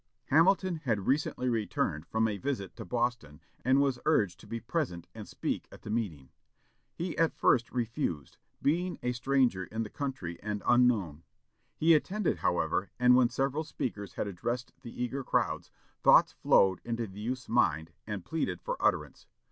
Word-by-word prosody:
Hamilton 180 +3 +4
had 115 -10 -1
recently 135 -2 0
returned 105 -9 -1
from 110 0 +1
a 105 -2 -3
visit 130 -8 -3
to - - -7
Boston, 120 -12 -2 0.2
and 130 +2 +4
was 135 -3 +1
urged 105 - +2
to - - -14
be 115 +2 -4
present 120 - -3
and - - -9
speak - - -3
at - - -14
the 105 - -5
meeting. 85 - -3 0.7
He 175 0 -3
at 165 -1 +2
first 120 -3 +3
refused, 115 - -3 0.3
being 175 +5 +1
a 125 - +1
stranger 125 -6 +1
in 110 +3 -3
the 105 - -8
country 130 -12 -4
and 105 -1 -4
unknown. 115 -11 +3 0.6
He 165 +1 +5
attended, 190 +5 +1
however; 95 - 0
and 125 0 +6
when 125 -2 +5
several 135 +4 -1
speakers 105 - -5
had - - -1
addressed 120 +6 -4
the 120 -1 -5
eager 135 +3 -3
crowds, - - 0 0.3
thoughts - - +6
flowed 95 -2 +3
into 115 0 -2
the 100 -1 -11
youth's 130 +4 -3
mind 80 -9 +1 0.2
and 105 -4 -5
pleaded 160 -1 -2
for - - -4
utterance. - - 0
120 Hz, 165 wpm, -30 LUFS, 100-140 Hz, 0.7 s, and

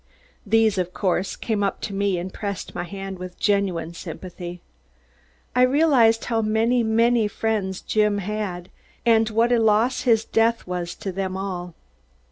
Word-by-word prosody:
These, 220 -2 +3
of 180 0 -3
course, 185 -1 0
came 220 -4 -2
up 200 -1 -1
to 200 - -4
me 195 -1 0
and 180 +2 -5
pressed 200 -3 -5
my - - -4
hand 195 0 -7
with 180 0 -8
genuine 190 -5 0
sympathy. 175 +1 -8 1.0
I 250 - +4
realized 255 -4 +4
how 230 -2 0
many, 225 +3 +2
many 230 0 +3
friends 205 -3 -2
Jim 210 -1 +1
had 195 -3 -4 0.3
and 225 -1 +4
what 230 +2 +2
a 240 - +4
loss 220 +3 +2
his 225 -3 +3
death 230 +1 +1
was 175 -1 -4
to 195 - -5
them 190 0 -3
all. 180 -3 -5
205 Hz, 155 wpm, -23 LUFS, 185-225 Hz, 1.0 s, I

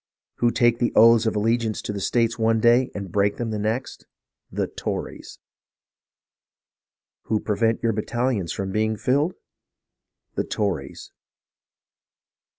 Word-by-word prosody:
Who 120 - +3
take 120 -1 +2
the 120 - +1
oaths 115 0 +6
of 110 - 0
allegiance 115 +1 0
to 105 - -4
the 100 - -4
States 115 +2 0
one 115 0 +2
day, 120 +3 +4
and 100 -3 -6
break 100 +2 +1
them 115 -2 -3
the 105 - -2
next? 110 +5 -3 0.4
The - - -1
Tories! - - -6 1.9
Who 110 - 0
prevent 115 +2 0
your 115 -1 +2
battalions 110 -4 -1
from 95 -1 -4
being 110 +1 0
filled? 145 - +1 1.0
The - - -1
Tories 100 -4 -3
115 Hz, 130 wpm, -23 LUFS, 105-120 Hz, 1.9 s, oaths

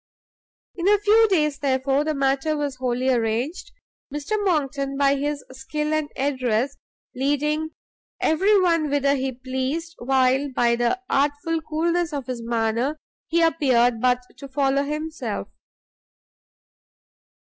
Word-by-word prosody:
In 355 0 -2
a 415 +1 +6
few 430 +2 +5
days, 300 -7 +1
therefore, 270 +1 +1
the 310 0 -1
matter 275 +3 +1
was 285 -3 -3
wholly 255 0 0
arranged, 240 +8 -1 0.4
Mr 295 +6 -6
Monckton, 275 -6 0
by 280 0 +4
his 285 +1 -2
skill 300 +4 -3
and 310 -1 0
address, 260 -2 0 0.4
leading 300 +4 -1 0.4
every 390 +6 +3
one 335 -4 +2
whither 280 0 +2
he 265 -1 -1
pleased, 260 +6 -3
while, 265 +2 +2
by 235 -1 +3
the 240 +10 0
artful 290 +4 0
coolness 335 +2 -1
of 280 -3 -3
his 255 -2 -5
manner, 230 +5 0 0.3
he 335 +1 +2
appeared 245 -8 +3
but 250 0 +2
to 275 - -9
follow 275 0 +1
himself. 305 +2 -4
280 Hz, 125 wpm, -23 LUFS, 260-310 Hz, 0.4 s, a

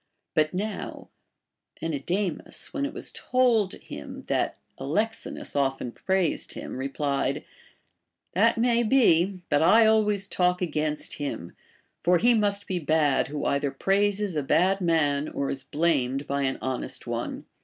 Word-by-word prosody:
But 155 0 +2
now 200 +2 -4 0.7
Menedemus, 165 +4 -3
>vhen 280 0 -1
it - - -10
Avas - - -5
told 240 -6 +2
him 70 - -9
that - - -1 0.2
Alexinus 210 +12 -3
often 135 -3 0
praised 190 +4 -1
him, - - -7
replied: 140 +1 -1 0.9
That 230 +6 +3
may 235 0 +3
be, 195 -7 +3
but 145 -1 +3
I 220 +7 +6
always 210 -2 +3
talk 180 -2 +1
against 155 -4 -2
him; 135 - -5 0.5
for 175 +1 +5
he 240 +7 +4
must 205 -2 +1
be 185 -2 -2
bad 155 -3 +2
who 145 0 -4
either 140 0 +1
praises 200 +5 +1
a 150 - +1
bad 185 +8 +2
man 155 -4 +1
or 140 - -2
is 135 -1 -4
blamed 140 -4 0
by 140 0 -1
an 130 - -1
honest 130 -1 -2
one. - - -4
170 Hz, 140 wpm, -26 LUFS, 140-205 Hz, 0.9 s, I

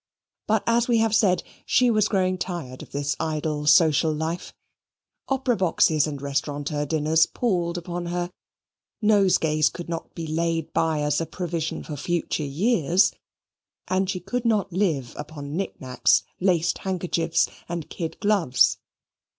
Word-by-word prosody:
But, 220 +1 +2
as 235 0 +2
we 240 -2 +3
have 225 -1 +2
said, 185 -5 +3 0.2
she 250 -1 +3
was 215 -2 +3
growing 185 -3 0
tired 160 -10 -5
of - - -12
this 140 0 -1
idle 155 -1 -2
social 160 -1 +5
life: 160 +3 -3 0.8
opera 265 -2 +1
boxes 165 -5 +3
and 145 -2 -5
restaurateur 145 +1 -2
dinners 160 +2 +3
palled 175 -7 -1
upon 175 0 -5
her: 175 +1 -2 0.7
nosegays 180 -7 +3
could 175 -1 -8
not 165 -1 -5
be 165 - -5
laid 165 0 -1
by 160 -2 +1
as 150 +1 +1
a 165 - -3
provision 170 -3 -3
for 150 - -6
future 170 +2 -1
years: 170 - +2 0.8
and 185 0 0
she 190 -2 -1
could 230 +7 -3
not 215 -6 +1
live 160 - 0
upon 145 -1 -7
knick 195 +3 -3
knacks, 130 -1 +2 0.2
laced 175 -3 +1
handkerchiefs, 170 -3 0 0.2
and 170 -3 -4
kid 165 -2 -5
gloves. 185 - +3
170 Hz, 145 wpm, -24 LUFS, 155-190 Hz, 0.8 s, social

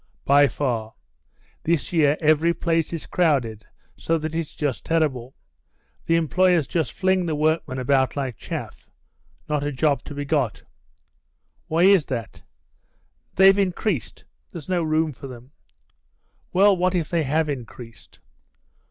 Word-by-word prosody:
"By 145 +1 +5
far. 115 -6 -3 0.7
This 170 +1 -1
year 150 -3 +3
every 155 +2 +3
place 165 -1 0
is 165 -2 -5
crowded, 125 - 0 0.3
so 165 - -1
that 155 0 -5
it's 165 -2 -4
just 140 -6 -2
terrible. 135 -6 -1 0.7
The 165 - +3
employers 170 0 +2
just 165 -3 -2
fling 185 -2 0
the 160 - -1
workmen 155 -3 0
about 130 0 +1
like 135 -4 -3
chaff. - - -7 0.6
Not 150 -2 -1
a 145 - -2
job 140 +1 +1
to 145 - -8
be 145 0 -4
got." 130 - -1 1.0
"Why 165 +2 +1
is 190 -5 +5
that?" 115 -3 -5 0.9
"They've 195 +1 +6
increased. 185 - -2 0.3
There's 165 -5 -9
no 180 -2 0
room 155 0 0
for 135 - -10
them." 125 +1 -12 1.0
"Well, 195 +2 +5
what 185 +1 0
if 165 -4 -2
they 170 -2 +1
have 155 +2 0
increased? 120 -4 -9
155 Hz, 140 wpm, -23 LUFS, 135-170 Hz, 1.0 s, They've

